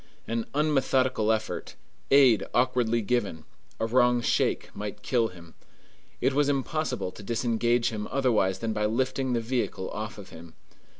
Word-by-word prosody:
An 115 Hz, 0 st, -2 dB
unmethodical 130 Hz, -6 st, +2 dB
effort, 110 Hz, 0 st, -3 dB, 0.3 s
aid 130 Hz, -6 st, +6 dB
awkwardly 120 Hz, -2 st, +2 dB
given, 100 Hz, -9 st, -1 dB, 0.3 s
a -, -, +1 dB
wrong 125 Hz, +1 st, +3 dB
shake, 120 Hz, -, 0 dB
might -, -, -6 dB
kill 115 Hz, -2 st, +2 dB
him. 85 Hz, -4 st, -14 dB, 0.7 s
It 135 Hz, -, +1 dB
was 145 Hz, +1 st, +2 dB
impossible 140 Hz, -6 st, -1 dB
to -, -, -12 dB
disengage 120 Hz, +2 st, +1 dB
him 105 Hz, -2 st, -4 dB
otherwise 115 Hz, -8 st, +1 dB
than 115 Hz, -1 st, -2 dB
by 105 Hz, 0 st, 0 dB
lifting 130 Hz, +3 st, -1 dB
the 120 Hz, -, +1 dB
vehicle 115 Hz, -5 st, -2 dB
off 105 Hz, 0 st, -5 dB
of 100 Hz, -2 st, -10 dB
him. 80 Hz, 0 st, -12 dB
120 Hz, 145 wpm, -27 LUFS, 105-130 Hz, 0.7 s, aid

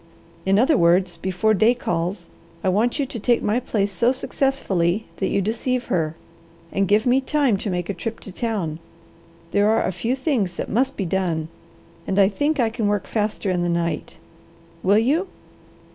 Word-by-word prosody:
In 195 Hz, +1 st, +4 dB
other 265 Hz, +6 st, +4 dB
words, 175 Hz, 0 st, +3 dB
before 190 Hz, +5 st, +1 dB
day 220 Hz, +4 st, +4 dB
calls, 175 Hz, -3 st, -2 dB, 0.4 s
I 190 Hz, -, +2 dB
want 215 Hz, +6 st, +1 dB
you 285 Hz, -, 0 dB
to 255 Hz, -3 st, -6 dB
take 240 Hz, +3 st, +2 dB
my 215 Hz, +4 st, +1 dB
place 205 Hz, -5 st, -1 dB
so 235 Hz, +7 st, +2 dB
successfully 220 Hz, -9 st, 0 dB
that 190 Hz, -, 0 dB
you 200 Hz, -, +1 dB
deceive 240 Hz, +4 st, -1 dB
her, 160 Hz, -3 st, 0 dB, 0.6 s
and 195 Hz, 0 st, +1 dB
give 210 Hz, +3 st, +3 dB
me 255 Hz, +2 st, +4 dB
time 275 Hz, -4 st, +2 dB
to 205 Hz, -, -4 dB
make 180 Hz, -2 st, -2 dB
a 200 Hz, -, -2 dB
trip 225 Hz, +5 st, -5 dB
to 195 Hz, -, -9 dB
town. 185 Hz, -7 st, -3 dB, 0.7 s
There 205 Hz, +1 st, +3 dB
are 220 Hz, -, +2 dB
a -, -, 0 dB
few 225 Hz, +8 st, -1 dB
things 255 Hz, -, -1 dB
that -, -, -4 dB
must 255 Hz, +6 st, +1 dB
be 195 Hz, -, -1 dB
done, 165 Hz, -3 st, -1 dB, 0.6 s
and 190 Hz, -, -1 dB
I 195 Hz, -1 st, +6 dB
think 290 Hz, +9 st, 0 dB
I 230 Hz, -3 st, +2 dB
can 225 Hz, -2 st, -1 dB
work 205 Hz, -1 st, 0 dB
faster 210 Hz, -2 st, -1 dB
in 180 Hz, -1 st, 0 dB
the 175 Hz, -, 0 dB
night. 170 Hz, -2 st, -2 dB, 0.6 s
Will 200 Hz, +2 st, +4 dB
you?" 290 Hz, -, +2 dB
205 Hz, 190 wpm, -22 LUFS, 180-240 Hz, 0.7 s, I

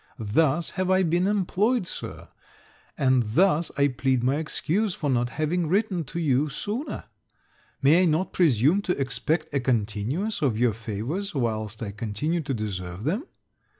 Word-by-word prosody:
Thus 140 Hz, +8 st, +1 dB
have 185 Hz, 0 st, -2 dB
I 190 Hz, 0 st, +4 dB
been 175 Hz, +2 st, +2 dB
employed, 205 Hz, +3 st, +1 dB
Sir; -, -, -7 dB, 0.7 s
and 130 Hz, -2 st, +3 dB
thus 160 Hz, -, +2 dB
I 140 Hz, 0 st, +4 dB
plead 130 Hz, -1 st, 0 dB
my 135 Hz, +3 st, +2 dB
excuse 175 Hz, +5 st, -1 dB
for 145 Hz, -3 st, -1 dB
not 120 Hz, -1 st, +1 dB
having 160 Hz, +4 st, -1 dB
written 190 Hz, -2 st, 0 dB
to 150 Hz, +6 st, -5 dB
you 150 Hz, -2 st, +2 dB
sooner. 210 Hz, -, -4 dB, 0.8 s
May 155 Hz, +6 st, +6 dB
I -, -, +4 dB
not 165 Hz, +3 st, +1 dB
presume 155 Hz, -, +3 dB
to 180 Hz, -5 st, -2 dB
expect 155 Hz, +4 st, -1 dB
a 140 Hz, -, +2 dB
continuance 125 Hz, -, -1 dB
of 130 Hz, -7 st, +1 dB
your 120 Hz, -1 st, +3 dB
favours 115 Hz, -, -4 dB
whilst 110 Hz, -3 st, -2 dB
I 100 Hz, -, -4 dB
continue 115 Hz, -, -2 dB
to 135 Hz, -2 st, -3 dB
deserve 95 Hz, -3 st, -5 dB
them? 195 Hz, -, -1 dB
150 Hz, 155 wpm, -26 LUFS, 120-180 Hz, 0.8 s, May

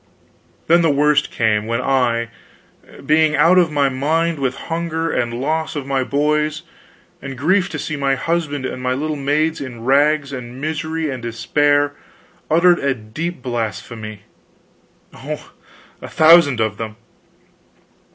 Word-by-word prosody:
Then 170 Hz, +2 st, +4 dB
the 165 Hz, -, +3 dB
worst 150 Hz, +1 st, +2 dB
came 110 Hz, -2 st, 0 dB
when 115 Hz, +1 st, -1 dB
I, 125 Hz, -3 st, +1 dB, 0.8 s
being 155 Hz, +1 st, +3 dB
out 165 Hz, +5 st, +5 dB
of 170 Hz, -3 st, +2 dB
my 145 Hz, -2 st, +2 dB
mind 155 Hz, +5 st, 0 dB
with 130 Hz, -2 st, -1 dB, 0.2 s
hunger 165 Hz, 0 st, -2 dB
and 120 Hz, -1 st, -1 dB
loss 155 Hz, +7 st, -2 dB
of 145 Hz, -3 st, -4 dB
my 135 Hz, -1 st, 0 dB
boys, 150 Hz, +3 st, 0 dB, 0.6 s
and 135 Hz, -1 st, -7 dB
grief 185 Hz, +7 st, +2 dB
to -, -, -5 dB
see 155 Hz, -, -4 dB
my 135 Hz, -1 st, +1 dB
husband 145 Hz, -2 st, -2 dB
and 130 Hz, -, -5 dB
my 125 Hz, 0 st, 0 dB
little 155 Hz, +3 st, -2 dB
maids 150 Hz, +3 st, 0 dB
in 120 Hz, -4 st, -7 dB
rags 140 Hz, +2 st, +2 dB
and 125 Hz, -1 st, -7 dB
misery 155 Hz, +1 st, -3 dB
and 130 Hz, -2 st, -6 dB
despair, 145 Hz, +5 st, +1 dB, 0.6 s
uttered 175 Hz, +2 st, +4 dB
a 140 Hz, -1 st, 0 dB
deep 125 Hz, +8 st, -6 dB
blasphemy 110 Hz, -3 st, -5 dB, 0.9 s
oh! -, -, -7 dB, 0.5 s
a -, -, -7 dB
thousand 155 Hz, -5 st, +5 dB
of 110 Hz, -2 st, -1 dB
them! 110 Hz, -1 st, -6 dB
145 Hz, 140 wpm, -19 LUFS, 125-155 Hz, 0.9 s, out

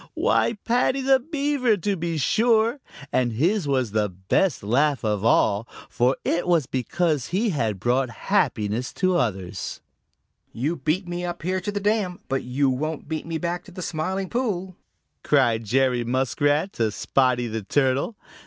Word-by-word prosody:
Why, 230 Hz, -, +2 dB
Paddy 250 Hz, +3 st, +2 dB
the 265 Hz, 0 st, +4 dB
Beaver 280 Hz, -5 st, 0 dB
to 200 Hz, +2 st, -1 dB
be 170 Hz, -2 st, -2 dB
sure, 225 Hz, -, +2 dB, 0.3 s
and 120 Hz, -2 st, +1 dB
his 170 Hz, -, +1 dB
was 130 Hz, -5 st, 0 dB
the 105 Hz, -1 st, +1 dB
best 95 Hz, -, 0 dB
laugh 135 Hz, +6 st, +2 dB
of 105 Hz, -2 st, 0 dB
all, 110 Hz, -1 st, +3 dB, 0.2 s
for 125 Hz, +1 st, +1 dB
it 170 Hz, +1 st, 0 dB
was 170 Hz, -5 st, +3 dB
because 140 Hz, +3 st, -1 dB
he 210 Hz, +6 st, 0 dB
had 110 Hz, -, -1 dB
brought 125 Hz, +4 st, +1 dB, 0.2 s
happiness 110 Hz, +4 st, +1 dB
to 185 Hz, -1 st, +1 dB
others. 95 Hz, -, -2 dB, 0.7 s
"You 145 Hz, +9 st, -1 dB
beat 155 Hz, +7 st, -1 dB
me 175 Hz, 0 st, -4 dB
up 175 Hz, -2 st, -5 dB
here 185 Hz, +2 st, -1 dB
to 205 Hz, -, -3 dB
the 205 Hz, -, -2 dB
dam, 205 Hz, -3 st, 0 dB
but 135 Hz, 0 st, 0 dB
you 130 Hz, +3 st, 0 dB
won't 145 Hz, +4 st, -2 dB
beat 160 Hz, +1 st, -4 dB
me 165 Hz, -1 st, -2 dB
back 175 Hz, +1 st, -3 dB
to -, -, -13 dB
the 180 Hz, 0 st, -7 dB
Smiling 185 Hz, +5 st, -2 dB
Pool," 190 Hz, -7 st, -2 dB, 0.5 s
cried 120 Hz, -6 st, +2 dB
Jerry 125 Hz, +1 st, +2 dB
Muskrat 145 Hz, +7 st, +1 dB
to 115 Hz, -2 st, 0 dB
Spotty 125 Hz, +3 st, +1 dB
the 110 Hz, -1 st, -3 dB
Turtle. 135 Hz, -, +1 dB
150 Hz, 160 wpm, -24 LUFS, 125-185 Hz, 0.7 s, the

